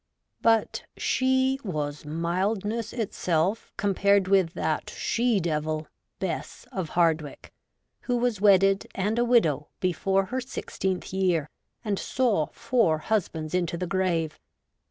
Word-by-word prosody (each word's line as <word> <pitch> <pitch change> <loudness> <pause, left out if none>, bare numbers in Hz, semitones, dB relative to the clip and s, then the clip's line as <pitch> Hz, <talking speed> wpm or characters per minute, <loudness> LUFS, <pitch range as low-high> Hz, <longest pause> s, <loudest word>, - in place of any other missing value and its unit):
But 225 -1 +2
she 260 +1 +2
was 150 -7 -3
mildness 195 +8 -1
itself 190 -4 -1
compared 200 -1 +3
with 190 -4 +3
that 155 -1 -1
'she 235 -3 +1
devil,' 155 -2 -1 0.3
Bess - - -4
of 180 -4 -3
Hardwicke, 160 -4 0 0.5
who 245 -1 -1
was 240 -4 0
wedded 195 -1 +5
and 210 +4 0
a - - +4
widow 165 - +3
before 190 +2 +1
her 260 +6 -3
sixteenth 190 -7 -4
year, 175 -6 +1 0.3
and 205 -2 0
saw 225 -12 +1
four 230 -9 +1
husbands 160 -4 -2
into 175 -2 0
the 180 - -2
grave. 170 -4 -1
190 Hz, 120 wpm, -26 LUFS, 165-220 Hz, 0.5 s, wedded